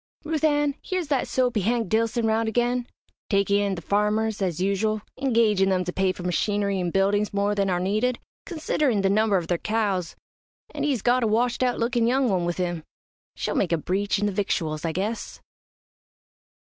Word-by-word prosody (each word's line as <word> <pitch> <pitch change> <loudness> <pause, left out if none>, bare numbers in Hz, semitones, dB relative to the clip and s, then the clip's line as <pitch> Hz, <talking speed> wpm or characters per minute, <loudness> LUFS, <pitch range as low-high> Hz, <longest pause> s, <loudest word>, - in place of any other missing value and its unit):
"Ruth 310 -1 -2
Ann, 295 -2 +2
here's 365 -5 -3
that 275 -3 +1
soapy 245 -4 +1
Hank 230 +2 0
Dillson 225 +2 +1
round 220 0 +1
again, 245 +2 0 0.4
takin' 200 0 +2
in 200 -1 0
the 170 - -8
farmers, 210 +2 0
as 180 -4 -1
usual, 205 +3 0 0.2
engagin' 225 -7 +3
them 185 -1 +1
to 180 0 -4
pay 190 -1 +1
for 180 - -8
machinery 200 +2 0
and 175 -1 -1
buildings 200 +2 +1
more 200 +1 +1
than 200 -1 0
are 180 -1 +1
needed, 215 +7 0 0.3
considerin' 300 - 0
the 195 0 +2
number 210 -1 +3
of 175 - -2
their 170 0 -1
cows, 205 -6 -1 0.6
an' 295 - -5
he's 280 -7 0
got 245 +1 +3
a - - +2
washed 235 +3 +1
out 250 -1 +1
lookin' 235 0 +1
young 260 +1 +2
one 180 -2 0
with 175 0 -2
him. 175 -3 -2 0.5
She'll - - -2
make 175 - 0
a 170 - +3
breach 195 +6 -1
in 205 - 0
the 205 - +1
victuals, 165 -6 -2
I 165 - 0
guess." 205 +7 -4
210 Hz, 190 wpm, -25 LUFS, 190-240 Hz, 0.6 s, engagin